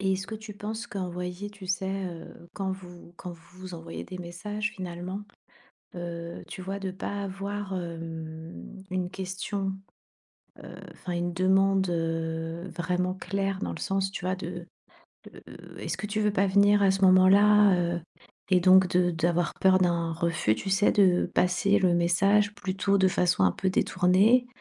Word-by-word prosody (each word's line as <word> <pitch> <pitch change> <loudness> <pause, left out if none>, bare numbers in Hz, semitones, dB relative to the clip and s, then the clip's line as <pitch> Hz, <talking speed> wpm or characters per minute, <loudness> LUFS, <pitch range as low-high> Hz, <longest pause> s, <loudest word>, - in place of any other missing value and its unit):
Et 190 -1 +1
est-ce 190 +1 -3
que 220 - -6
tu 215 -1 -9
penses 220 +3 -5
qu'envoyer, 180 +1 -5
tu 200 -2 -11
sais, 190 +1 -1
heu, 170 0 -9
quand 190 -1 -3
vous 175 -2 -11
quand 180 - -7
vous 170 +2 -18
vous 185 -2 -7
envoyez 165 0 -7
des 185 -1 -8
messages 205 +5 -4
finalement, 185 +2 -6 0.7
heu, 170 -1 -6
tu 185 - -7
vois? 195 +2 -4
De 190 -1 -4
pas 200 +2 -5
avoir, 195 0 -5
hem, 165 - -7
une 185 -1 -2
question, 190 +1 -3 0.9
heu, - - -10 0.2
enfin 180 - -6
une 175 0 -2
demande, 190 +1 +3
heu, 165 +1 -3
vraiment 180 +1 -1
claire? 195 +1 -2
Dans - - -3
le - - -8
sens, 195 -1 -1
tu 190 - -6
vois 185 +1 0
de 175 -1 -7 0.7
de - - -13
«Est-ce - - -3
que 210 - -5
tu 215 +1 -2
veux 210 -1 +2
pas 195 0 +2
venir 200 +1 +4
à 195 - +5
ce 195 0 -1
moment-là, 195 +2 +6 0.2
heu?» 175 - -3 0.5
Et 185 - +6
donc, 185 +1 +6
de 180 -1 +2
d'avoir 170 +1 0
peur 190 0 +5
d'un 170 -2 +1
refus, 160 - 0
tu 195 - -5
sais? 195 +2 +3
De 185 -3 +4
passer 190 +3 +3
le 180 -3 +3
message 195 +5 +3
plutôt 195 +1 0
de 190 - +4
façon 175 - +2
un 90 - +4
peu 190 -1 -1
détournée, 200 +8 +3
185 Hz, 170 wpm, -27 LUFS, 175-195 Hz, 0.9 s, moment-là